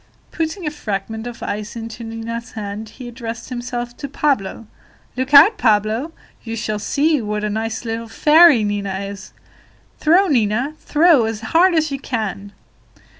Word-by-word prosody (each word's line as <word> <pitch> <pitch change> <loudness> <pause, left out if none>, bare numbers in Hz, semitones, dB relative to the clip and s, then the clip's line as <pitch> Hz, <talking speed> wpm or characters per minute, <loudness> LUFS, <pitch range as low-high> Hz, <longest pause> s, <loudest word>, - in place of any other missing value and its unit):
Putting 330 +2 -3
a 300 - -1
fragment 220 -4 -4
of 240 - -8
ice 210 +2 -4
into 230 0 -7
Nina's 225 +1 -6
hand, 210 0 -6
he 250 +2 -10
addressed 235 -1 -7
himself 240 -1 -5
to 280 - -5
Pablo: 255 -7 -1 0.5
"Look 260 +2 -3
out, 395 +10 +8
Pablo; 220 +6 +1 0.3
you 230 -1 -5
shall 215 -2 -3
see 290 +7 +1
what 210 -1 -3
a 210 - -1
nice 220 +2 -3
little 230 0 -4
fairy 300 +1 +6
Nina 200 -2 -2
is! 200 -1 -8 0.7
Throw, 345 +6 +4
Nina, 245 - +1
throw, 310 -5 +4
as 220 -1 -4
hard 340 +10 +3
as 310 -2 +1
you 275 - -3
can." 210 -6 -4
230 Hz, 155 wpm, -19 LUFS, 215-285 Hz, 0.7 s, out